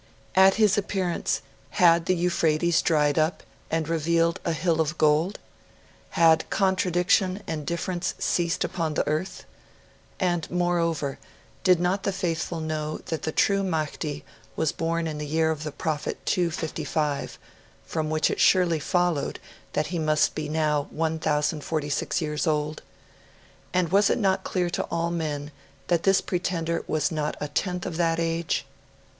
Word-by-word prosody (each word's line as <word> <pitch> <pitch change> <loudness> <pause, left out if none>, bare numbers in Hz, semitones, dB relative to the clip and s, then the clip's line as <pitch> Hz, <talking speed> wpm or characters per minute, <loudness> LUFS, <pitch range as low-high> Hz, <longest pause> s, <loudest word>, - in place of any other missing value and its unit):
At 190 0 +6
his 210 -2 +4
appearance, 190 -3 -1 0.3
had 170 -1 +4
the 185 - +3
Euphrates 170 -1 +2
dried 150 -2 +2
up 155 +3 0 0.3
and 160 -1 -1
revealed 165 +2 +1
a 170 - 0
hill 160 0 +1
of 155 +1 -2
gold? 155 +6 +2 0.8
Had 160 -1 +5
contradiction 185 0 +2
and 150 -3 -4
difference 175 +1 -2
ceased 170 -1 0
upon 160 -4 -2
the - - 0
earth? 155 +5 -2 0.7
And, 175 -4 0
moreover, 170 -5 0 0.4
did 180 -2 +5
not 180 +3 +1
the 200 - 0
faithful 170 -2 -2
know 155 -1 -3 0.2
that 160 - -2
the 155 - -2
true 200 +4 +2
Mahdi 155 -4 -3 0.3
was 160 -2 +1
born 165 0 -1
in 155 -2 -4
the 150 - -4
year 160 +1 +2
of 155 -2 -4
the 155 - -4
Prophet 150 0 -3
255, 155 -4 -1 0.5
from 155 -2 -2
which 155 0 +1
it - - -3
surely 175 -4 +4
followed 175 -2 0 0.3
that 150 - +1
he 170 - 0
must 155 -1 +2
be 150 -1 -4
now 150 -2 +1
1,046 155 -1 -1
years 150 +2 -2
old? 150 0 -1 0.9
And 180 -2 +1
was 200 +1 +4
it - - +2
not 195 -4 +1
clear 180 -2 -1
to - - -1
all 170 0 -1
men 150 -3 -3 0.4
that 170 -2 +3
this 195 +1 +4
pretender 170 -2 -2
was 155 +2 0
not 150 -1 -2
a 150 - -3
tenth 180 +4 -2
of 170 -3 -4
that 165 -1 +1
age? 165 0 -1
165 Hz, 150 wpm, -26 LUFS, 155-180 Hz, 0.9 s, At